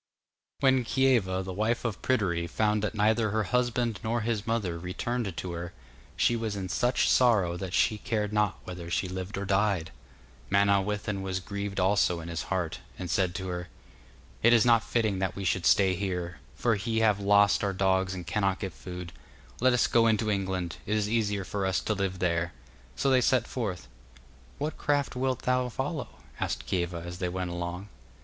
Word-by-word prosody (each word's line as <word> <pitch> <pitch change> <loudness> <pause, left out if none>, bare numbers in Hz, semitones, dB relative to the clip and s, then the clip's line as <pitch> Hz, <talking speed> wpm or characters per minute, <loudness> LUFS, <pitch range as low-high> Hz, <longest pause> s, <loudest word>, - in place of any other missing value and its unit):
When 130 -2 +4
Kieva, 115 -8 +2
the 95 0 -5
wife 110 +6 0
of 115 -3 -2
Pryderi, 90 -9 +1
found 105 +4 +1
that 105 +1 -2
neither 110 +1 +2
her 110 +1 0
husband 120 -1 0
nor 115 +1 0
his 110 -1 -2
mother 100 -7 -1
returned 100 +3 -3
to 90 - -4
her, 85 0 -5 0.4
she 120 - +3
was 110 -3 -2
in 95 -2 -4
such 125 +5 +2
sorrow 105 -9 +4
that 95 0 -5
she 110 - +2
cared 105 -2 -2
not 105 -2 +1
whether 90 -2 -7
she 90 +2 0
lived 95 +2 -5
or 100 - -3
died. 95 -4 +1 0.6
Manawyddan 100 0 +1
was 95 -1 -2
grieved 100 +1 -4
also 95 -2 +2
in 85 +1 -7
his 85 -2 -3
heart, 85 -3 -1 0.2
and 90 -2 -4
said 90 -2 +1
to 95 +1 -4
her: 90 0 -4 0.7
'It 120 - +6
is 120 -2 +5
not 115 -2 +5
fitting 110 -5 0
that 95 0 -1
we 100 - -5
should 90 -1 +1
stay 95 -2 +5
here, 90 -3 -3 0.2
for 120 - +1
he 110 +3 -1
have 105 -3 +3
lost 100 +1 +4
our 100 - +1
dogs 95 0 +1
and 90 -1 -6
cannot 95 +1 0
get 95 -3 -4
food. 90 -1 -8 0.5
Let 130 +1 +4
us 125 - +3
go 115 -1 +4
into 110 -1 +2
England 95 -3 -2
it 105 +1 +1
is 105 -1 0
easier 105 -3 0
for 100 +2 -3
us 95 -1 +1
to 110 - -1
live 95 -2 -2
there.' 85 -1 0 0.4
So 135 - +1
they 130 -1 +5
set 125 -1 +3
forth. 100 -9 -4 0.7
'What 150 +2 -3
craft 145 -2 0
wilt 130 0 -1
thou 125 0 +1
follow?' 135 0 -5 0.2
asked - - -2
Kieva 85 -2 -2
as 90 +1 -7
they 90 - -1
went 90 0 -3
along. 85 +3 -4
100 Hz, 190 wpm, -28 LUFS, 90-115 Hz, 0.7 s, It